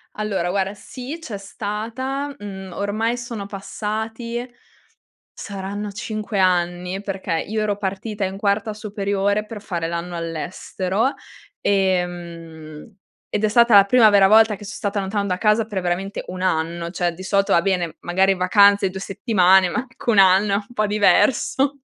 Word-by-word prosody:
Allora 200 -5 -2
guarda 195 +1 -1
sì, 255 +8 -8
c'è 225 -10 -6
stata. 230 +8 -4
Mhmm, 190 -2 -8
ormai 220 +5 -1
sono 235 -4 -6
passati 220 +4 -5 0.9
saranno 200 +1 -5
5 215 0 -4
anni, 180 0 +1
perché 190 -4 -3
io 215 +1 -2
ero 205 -1 -1
partita 205 +1 -4
in 190 +1 -5
quarta 205 +1 0
superiore 205 -1 -1
per 215 -1 -8
fare 170 -5 -3
l'anno 170 +1 -4
all'estero 180 - -2 0.5
e, 190 -2 +2
mhmm, 165 0 -10 0.3
ed 210 - -2
è - - +4
stata 235 0 +5
la 200 - +9
prima 225 +1 +6
vera 200 -2 +6
volta 220 +1 +5
che 200 - -12
son 210 - -7
stata 200 0 -2
lontano 200 +1 -2
da 180 -1 -1
casa 215 +2 +2
per 205 -4 -4
veramente 180 +3 -2
1 185 0 -6
anno; 170 -1 -1
cioè 175 -1 0
di 175 - -11
solito, 200 +1 +1
va 170 - +5
bene, 180 -4 -1
magari 190 +2 +2
vacanze 200 +1 +4
2 190 +1 -7
settimane 190 -2 +3
ma - - -3
anche 250 0 -9
1 220 - +3
anno 195 +2 +5
è - - +4
un 205 +3 -5
po' 215 -3 0
diverso. 265 +6 +2
200 Hz, 160 wpm, -21 LUFS, 185-215 Hz, 0.9 s, la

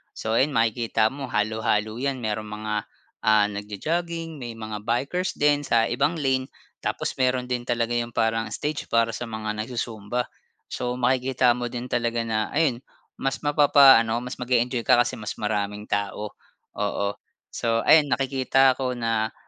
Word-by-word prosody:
So, 110 0 -3
ayun 140 +1 +1
makikita 115 0 +2
mo 135 -1 -6
halo-halo 110 0 0
'yan 135 -3 -2
mayroong 110 0 -2
mga, 105 0 -5 0.5
ah, 105 -1 +5
nagjo-jogging 165 - -3
may 120 -3 -6
mga 110 -1 -7
bikers 140 +10 -1
din 145 -1 +2
sa 115 -1 +4
ibang 140 +8 +1
lane. 130 -4 0 0.3
Tapos - - -2
meron 130 -1 +2
din 125 0 -2
talaga 120 -1 0
yung 120 -1 -2
parang 115 0 +1
stage 150 0 -3
para 115 0 +2
sa 120 +2 -5
mga 110 -1 -4
nagzu-zumba. 115 0 -3 0.4
So 125 0 -2
makikita 125 0 +2
mo 120 - -2
din 120 +1 -6
talaga 120 -1 0
na 110 -1 -1
ayun 145 -7 +2 0.4
mas 135 0 -2
mapapaano 135 -6 +5
mas 125 - -6
mag-eenjoy 125 -1 0
ka - - +5
kasi 120 - -2
mas 105 - -4
maraming 105 0 -2
tao, 100 +1 -2 0.5
oo. 100 0 -1 0.4
So 115 -1 0
ayun 155 -2 +6
nakikita 135 -1 +2
ko 130 -2 -1
na 115 -2 -1
120 Hz, 155 wpm, -25 LUFS, 110-130 Hz, 0.5 s, ayun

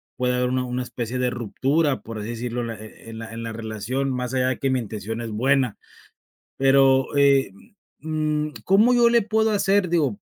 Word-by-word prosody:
puede 125 0 0
haber 125 0 0
una 130 0 0
una 125 0 -3
especie 120 0 -5
de 125 -1 0
ruptura, 135 +6 0
por 115 -1 -7
así 105 +2 -5
decirlo, 120 +1 -3
la 115 -1 -5
e 110 +1 -13
e - - -10
en 110 - -8
la 115 0 -8
en 115 - -6
la 115 0 -5
relación, 115 +5 -3
más 125 0 -3
allá 130 0 +2
de 130 - -3
que 135 - 0
mi 130 - +1
intención 110 0 -5
es 115 -2 -5
buena, 130 +1 +1 0.8
pero, 135 0 +4
eh, 140 -4 +4 0.5
mm, 155 0 -2
¿cómo 215 +6 +4
yo 240 -1 +5
le 235 -1 +4
puedo 220 +1 +1
hacer?, 200 -2 +2
digo, 150 -11 0
125 Hz, 205 wpm, -23 LUFS, 115-145 Hz, 0.8 s, yo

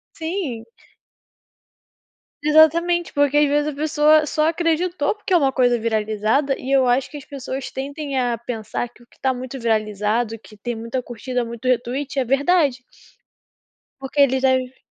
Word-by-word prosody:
Sim. 320 - -4 1.8
Exatamente, 335 +3 +4
porque 285 0 +3
às 295 - +5
vezes 295 +1 +1
a 295 - -4
pessoa 305 +1 +3
só 305 +1 +1
acreditou 335 0 0
porque 420 -2 -6
é 360 - +7
uma 275 -5 +3
coisa 245 -2 +3
viralizada 220 +5 0
e 260 - -6
eu 270 -2 +4
acho 245 +2 +1
que 300 - -8
as 285 - -9
pessoas 270 -1 -6
tendem 280 0 -4
a 245 -2 0
pensar 230 0 -4
que 245 - -21
o 240 - -20
que - - -26
está 265 - 0
muito 255 +1 -6
viralizado, 220 0 0
que 215 0 -16
tem 240 +3 -4
muita 230 +3 -4
curtida, 245 +1 -3
muito 235 +2 -7
retweet 255 +3 -1
é 260 - +2
verdade. 275 0 +2 1.2
Porque 270 +2 -2
eles 265 -1 +3
deve 260 -1 +1
265 Hz, 160 wpm, -21 LUFS, 240-295 Hz, 1.8 s, é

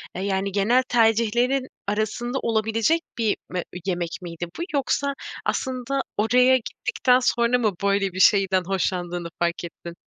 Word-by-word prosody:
Eee, 185 - -4
yani, 195 0 -1
genel 215 +6 +3
tercihlerin 240 +3 +2 0.2
arasında 215 +5 -1
olabilecek 225 +7 +1 0.2
bir 225 -3 +1
me 180 -1 -3 0.2
yemek 175 -3 -1
miydi 175 -1 -6
bu? - - -1
Yoksa 280 0 0 0.3
aslında 260 +1 -1 0.2
oraya 250 +5 +4
gittikten 250 +1 +1
sonra 240 -1 +2
mı 220 -3 +2
böyle 200 -1 +1
bir 185 - -5
şeyden 190 -1 +4
hoşlandığını 175 -2 -2
fark 170 0 -1
ettin? 170 0 -9
215 Hz, 135 wpm, -24 LUFS, 190-250 Hz, 0.3 s, oraya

